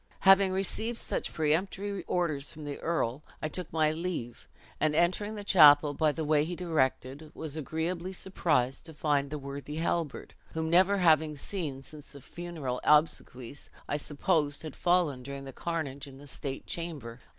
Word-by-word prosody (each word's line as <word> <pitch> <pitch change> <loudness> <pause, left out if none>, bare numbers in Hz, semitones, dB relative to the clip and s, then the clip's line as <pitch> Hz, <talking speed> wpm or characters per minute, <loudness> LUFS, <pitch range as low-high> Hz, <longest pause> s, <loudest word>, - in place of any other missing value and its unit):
"Having 195 0 +6
received 220 +5 -2
such - - -3
peremptory 190 +6 -1
orders 155 -6 -1
from 155 -1 -9
the 145 -1 -5
earl, 150 -5 -1 0.2
I - - -2
took 180 +1 -5
my 155 -1 +2
leave; 155 -8 -4 0.3
and 155 -1 +2
entering 185 +6 +1
the 205 - -6
chapel 150 -6 +7
by 155 0 +2
the 160 +1 -3
way 150 -1 +3
he 175 +3 -4
directed, 155 -3 -1
was 155 -2 -5
agreeably 165 +4 -3
surprised 150 -9 0
to 160 - -11
find 145 -2 +1
the 150 - -4
worthy 140 +1 -7
Halbert, 165 -2 -2 0.2
whom, 160 0 -1
never 190 +3 +5
having 160 -4 +3
seen 145 -6 -4
since 150 -1 -11
the 140 - -11
funeral 155 -6 -5
obsequies, 145 -4 +1 0.2
I 145 - 0
supposed 150 0 0
had 155 -3 -7
fallen 175 -7 +2
during 140 +2 -7
the 135 - -8
carnage 145 -4 -4
in 135 -1 -12
the 145 - -13
state 135 -1 -5
chamber. 145 -9 -6
155 Hz, 165 wpm, -30 LUFS, 140-175 Hz, 0.3 s, chapel